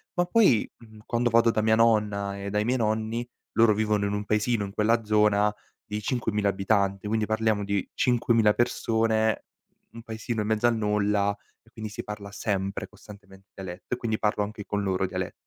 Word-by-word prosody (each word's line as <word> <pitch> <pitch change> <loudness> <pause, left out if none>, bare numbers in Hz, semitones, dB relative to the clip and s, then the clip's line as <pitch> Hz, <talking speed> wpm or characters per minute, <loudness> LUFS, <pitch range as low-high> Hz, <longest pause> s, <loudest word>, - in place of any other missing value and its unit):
Ma 175 0 +2
poi, 180 - +4
mhmm, 110 -2 -16
quando 120 +1 0
vado 115 0 +4
da 110 - 0
mia 110 0 +3
nonna 105 -3 +2
e 100 - -4
dai 105 +1 0
miei 125 +1 +1
nonni, 110 +2 -1 0.2
loro 115 -2 +4
vivono 105 -1 +1
in 100 - -2
un 105 0 -3
paesino 105 0 +1
in 100 - -7
quella 115 +2 +2
zona 105 -1 +3 0.3
di 105 0 -4
5000 105 -3 0
abitanti, 100 0 0
quindi 110 0 0
parliamo 110 -1 +1
di 100 -1 -1
5000 115 -3 +3
persone, 110 -2 +1 0.5
n - - -13
un - - -7
paesino 110 0 -4
in 105 - -3
mezzo 110 +1 +1
al 120 -1 +4
nulla 105 -1 +1 0.3
e 115 - -24
quindi 110 -2 -7
si - - -6
parla 105 -1 -7
sempre 100 -2 -2
costantemente 100 -2 -16
dialetto 95 +3 -7
e - - -1
quindi 110 -3 -2
parlo 105 -1 0
anche 105 0 -7
con 105 0 -2
loro 95 -1 0
diale 95 0 -4
105 Hz, 190 wpm, -26 LUFS, 100-115 Hz, 0.5 s, poi